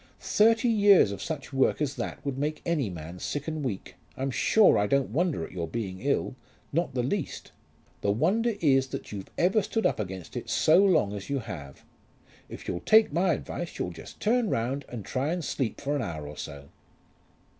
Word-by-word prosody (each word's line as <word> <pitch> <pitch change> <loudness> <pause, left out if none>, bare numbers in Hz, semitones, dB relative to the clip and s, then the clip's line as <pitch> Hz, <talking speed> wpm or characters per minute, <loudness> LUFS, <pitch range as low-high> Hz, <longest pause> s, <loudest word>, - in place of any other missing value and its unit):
Thirty 225 +3 +3
years 205 - +6
of 100 - -6
such 145 -3 -5
work 135 0 +2
as 145 -3 0
that 120 - -5
would 140 -2 -2
make 150 +3 -2
any 155 -10 0
man 85 0 -8
sick 145 - -4
and 155 -2 -3
weak. 110 -8 -4 0.2
I'm 135 +1 -1
sure 215 +10 +5
I 105 - +2
don't 140 +3 +1
wonder 165 - 0
at - - -12
your 85 -3 -4
being 95 -2 -4
ill; 140 +2 0 0.4
not 165 -3 0
the 125 - +1
least. 155 +5 -3 0.5
The 100 - 0
wonder 205 - +2
is 135 -4 +4
that - - -7
you've 100 -2 -7
ever 190 +5 +3
stood 220 +2 -2
up - - +2
against 95 -4 -6
it - - -5
so 170 +5 +5
long 135 - +3
as 100 -1 -7
you 140 - 0
have. 85 - -8 0.7
If - - -9
you'll 90 - -2
take 215 - +5
my 175 +2 +3
advice 175 +2 -5
you'll 90 - -2
just 85 - -11
turn 235 0 +2
round 130 +5 -1
and 115 -5 -7
try 140 +6 -1
to 175 - -4
sleep 130 -7 -2
for 145 +1 -1
an 145 - 0
hour 80 -9 -5
or 75 - -8
so." 70 -2 -8
135 Hz, 200 wpm, -28 LUFS, -, 0.7 s, years